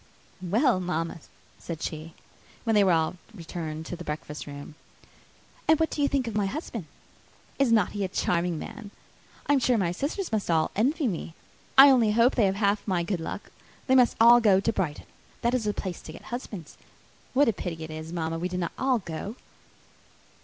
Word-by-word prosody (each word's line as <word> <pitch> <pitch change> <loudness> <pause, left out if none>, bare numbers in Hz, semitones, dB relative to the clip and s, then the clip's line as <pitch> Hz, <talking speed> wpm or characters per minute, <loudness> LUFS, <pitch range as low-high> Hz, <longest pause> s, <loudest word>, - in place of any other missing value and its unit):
"Well, 215 - +2
mamma," 165 -1 -2 0.4
said 165 -2 -6
she, 160 +1 -5 0.5
when 225 - +1
they 205 -1 +5
were 190 - +4
all 165 +2 +1 0.2
returned 160 -3 -6
to 175 - -5
the 175 - -8
breakfast 150 -1 -6
room, 145 +1 -8 0.9
"and 315 -1 +5
what 320 - +1
do 295 - -2
you 285 - +4
think 275 -2 0
of 225 - -3
my 205 -1 +1
husband? 230 - -5 0.7
Is 275 -4 +3
not 220 -5 +3
he 205 -1 -3
a - - 0
charming 175 -2 0
man? 220 +4 -8 0.6
I 290 - +3
am 280 - +4
sure 250 -1 +2
my 180 -5 +1
sisters 295 - -3
must 215 -4 -1
all 160 -2 +2
envy 270 - +1
me. 170 -4 -4 0.4
I 275 +1 +10
only 230 -5 +4
hope 235 +3 +4
they 245 - +1
may - - +5
have 190 - 0
half 205 +1 0
my 180 -3 +1
good 180 0 -2
luck. - - -6 0.3
They 260 - +2
must 250 -2 +5
all 235 +1 +8
go 200 -4 +5
to 225 +3 0
Brighton. 160 -7 -2 0.4
That 235 +1 +2
is 250 -4 0
the 210 - +2
place 185 -3 -5
to - - -9
get - - -12
husbands. 205 - -7 0.6
What 285 +1 +5
a 230 - +3
pity 165 -4 -5
it 160 - -7
is, 155 +1 -7
mamma, 165 -1 -2
we 180 +2 -2
did 180 0 -3
not 170 - -2
all 260 -1 +2
go!" 195 +2 -6
195 Hz, 205 wpm, -27 LUFS, 165-235 Hz, 0.9 s, I